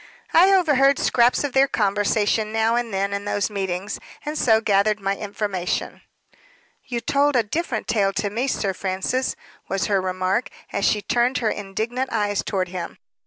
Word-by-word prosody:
"I 370 +4 +6
overheard 285 -7 +4
scraps 240 +3 +3
of 285 -3 -3
their 270 +1 +5
conversation 210 0 +1
now 225 +1 +2
and 240 -1 -1
then 200 +1 -1
in 200 0 -3
those 205 +1 -1
meetings, 195 0 -3 0.3
and 300 +1 -3
so 225 -7 +4
gathered 210 0 +2
my 195 0 -1
information." 200 -3 -3 0.8
"You 240 -2 -3
told 280 +4 +2
a 240 - +4
different 245 0 -3
tale 205 -3 +2
to 205 0 -2
me, 240 +6 -1
Sir 200 -7 -1
Francis," 190 +8 -2 0.3
was 195 - -1
her 195 -2 +1
remark, 185 +5 -1 0.2
as 200 - 0
she 210 -1 +2
turned 245 +5 +1
her 225 -3 0
indignant 220 +6 -3
eyes 205 -3 0
toward 185 -3 -2
him. 175 -2 -6
215 Hz, 165 wpm, -23 LUFS, 195-245 Hz, 0.8 s, I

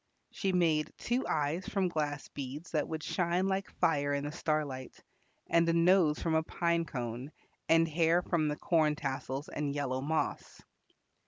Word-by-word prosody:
She 195 -3 -1
made 165 -4 +2
two 245 +2 -1
eyes 155 +5 -1
from 195 -2 +1
glass 150 -4 -2
beads 145 +4 -7
that 150 -3 0
would 160 -1 -4
shine 180 +1 0
like 195 0 -1
fire 145 -3 +1
in 140 - -2
the 145 - -3
starlight, 150 -5 -2 0.5
and 170 0 +3
a - - +3
nose 170 -2 +4
from 165 - -1
a 160 - +4
pine 170 +1 0
cone, 125 0 -5 0.4
and 165 0 +5
hair 165 +2 +2
from 165 -4 +1
the 150 0 -1
corn 155 -3 +2
tassels 135 0 -4
and 145 -1 -3
yellow 130 -3 -1
moss. 155 +3 -2
155 Hz, 165 wpm, -32 LUFS, 145-170 Hz, 0.5 s, and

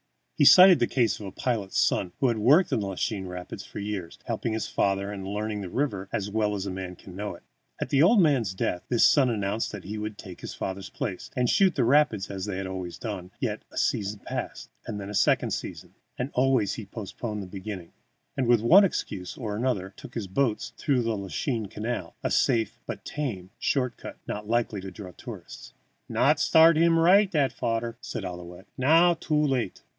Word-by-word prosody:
He 145 - +4
cited 185 +3 +9
the - - +2
case 115 -6 +1
of 105 - -7
a - - -7
pilot's 105 -3 -1
son 90 -2 +1
who 135 - +3
had 115 -3 0
worked 145 - +5
in - - +2
the 100 - -2
Lachine 95 0 -3
Rapids 90 +2 -7
for - - -11
years, 100 -4 -4
helping 115 - -2
his 110 - -2
father, 100 0 0
and 95 -2 -6
learned 105 0 -3
the 90 - -6
river 100 -6 -2
as 105 0 -2
well 105 -1 0
as 95 -1 -3
a 100 - -3
man 90 -1 -6
can 90 0 -13
know 100 -1 -4
it. - - -17 0.4
At - - -3
the 140 0 +3
old 200 +7 +6
man's 130 - +2
death, 90 -1 -1
this 120 -2 +4
son 135 -4 +5
announced 105 -1 -1
that 105 -3 -7
he 105 +3 -5
would 105 -1 -5
take 95 -4 -10
his - - -7
father's 95 0 -5
place, 95 -5 -5
and 125 -1 +1
shoot 190 +4 +3
the 130 - +2
rapids 120 -7 +3
as 95 -1 -4
they 100 -2 -3
always 95 -2 -5
had - - -17
done; 95 -6 -5
yet - - -2
a - - -11
season 100 0 -1
passed, - - -6 0.2
then 100 -1 -5
a 105 - -6
second - - +2
season, - - -5 0.2
and 130 +3 -3
always 125 -5 +2
he 110 -4 -7
postponed 105 -1 -6
beginning, 95 -3 -7 0.4
and, 130 - 0
with 120 -2 +4
one 175 - +7
excuse 100 - -3
or 110 -4 -4
another, 105 -5 -1
took 120 - -12
his 115 -4 -3
boats 110 +4 -1
through 130 -4 +1
the 115 -1 0
Lachine 105 +3 -3
Canal, 105 -4 -4
a - - -1
safe 115 -3 +1
but - - -6
tame 105 -11 -4
short 125 -4 0
cut, - - -9
not 105 0 -5
likely 115 -4 0
to 95 - -6
draw 95 0 -9
tourists. - - -10 0.3
"Not - - +3
start 160 0 +6
heem 165 0 +4
right, 190 +4 +5
that 145 -5 +1
fadder," 115 0 -2
said 105 - -5
Ouillette. 90 +1 -8
"Now 165 +7 +5
too 160 -2 -3
late. 130 - -1
105 Hz, 210 wpm, -27 LUFS, 95-130 Hz, 0.4 s, cited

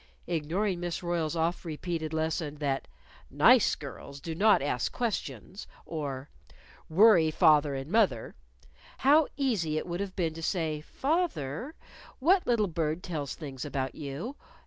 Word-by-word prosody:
Ignoring 175 +4 -1
Miss 175 0 -3
Royle's 170 -2 -1
oft 165 +2 0
repeated 160 -1 -4
lesson 160 -1 -2
that 140 -2 -2 0.4
"Nice - - +5
little - - -6
girls 140 0 -11
do 165 +3 -5
not 200 -3 +4
ask 125 -4 -1
questions," 195 - -4 0.2
or 140 -4 -4 0.6
"worry 175 -2 +6
father 150 -2 +4
and 135 +4 -6
mother," 195 - +2 0.7
how 295 +2 +6
easy 205 - 0
it - - -2
would 175 0 -4
have 195 -2 -4
been 165 -4 0
to 165 - -8
say, 160 -3 -1
"Fath 320 - 0
er, 150 - -5 0.4
what 355 +7 +3
little 235 -3 +3
bird 165 -1 -2
tells 155 -7 -4
things 135 -5 -7
about 135 -3 -3
you?" 150 - -6
165 Hz, 145 wpm, -29 LUFS, 150-195 Hz, 0.7 s, worry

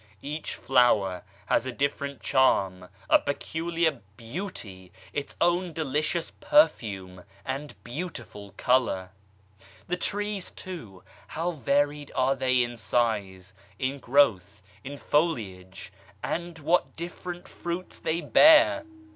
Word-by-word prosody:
Each 150 +2 -4
flower 110 -8 +3 0.2
has 120 - +1
a - - -2
different 140 0 -2
charm, 95 -9 +2 0.2
a - - +6
peculiar 160 0 -1 0.2
beauty, 115 - -7 0.2
its 145 -1 -4
own 175 0 +2
delicious 155 +2 -1
perfume 105 - +2 0.2
and 140 +3 -4
beautiful 120 - -7
colour. 115 -8 +1 0.8
The 180 - -1
trees 205 0 -2
too, 115 - -9 0.2
how 170 +3 -2
varied 145 0 0
are 130 +1 +2
they 130 -1 +2
in 120 0 -5
size, 100 -6 -1 0.2
in 135 +1 -2
growth, 105 -8 +2 0.2
in 140 +1 -7
foliage 105 - -1 0.3
and 170 0 -3
what 160 +4 +1
different 175 +1 -7
fruits 175 +2 -6
they 165 +2 -1
bear 310 - +6
140 Hz, 110 wpm, -27 LUFS, 110-170 Hz, 0.8 s, a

